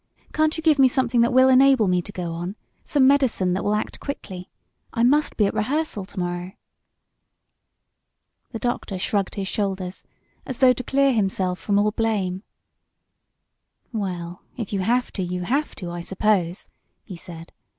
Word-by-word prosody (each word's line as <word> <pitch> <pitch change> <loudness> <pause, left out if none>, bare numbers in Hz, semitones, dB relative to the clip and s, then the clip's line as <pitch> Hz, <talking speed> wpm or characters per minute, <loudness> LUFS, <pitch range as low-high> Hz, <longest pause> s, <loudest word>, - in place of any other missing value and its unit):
Can't 310 +1 +1
you 320 - -5
give 310 -3 +4
me 265 - +7
something 250 -2 +1
that 235 - +3
will 260 +1 +6
enable 260 -4 +5
me 180 -1 +2
to 205 - -10
go 175 -3 -4
on 175 +4 -5 0.3
some 280 -3 +3
medicine 260 -10 +3
that 190 - -2
will 210 - +1
act 210 - -3
quickly? 190 -10 -7 0.4
I 230 - 0
must 290 +5 +3
be 210 - +4
at 200 - 0
rehearsal 220 -2 -2
to 195 - -8
morrow." 175 +1 -3 2.0
The 225 - -5
doctor 225 -4 -3
shrugged 195 +1 -1
his 195 -1 -3
shoulders 190 -2 -3 0.4
as 260 - -6
though 255 -1 +6
to 250 - -6
clear 275 0 +2
himself 190 -4 0
from 200 -1 0
all 210 +1 +3
blame. 205 -5 -1 1.5
"Well, 180 -5 -4 0.2
if 225 -4 -5
you 195 - 0
have 245 +6 +1
to 195 - -4
you 180 0 -3
have 280 +10 -1
to, 175 -2 -6
I 175 0 -5
suppose," 190 -1 0 0.4
he 185 - -9
said. 170 -1 -11
205 Hz, 170 wpm, -23 LUFS, 185-255 Hz, 2.0 s, me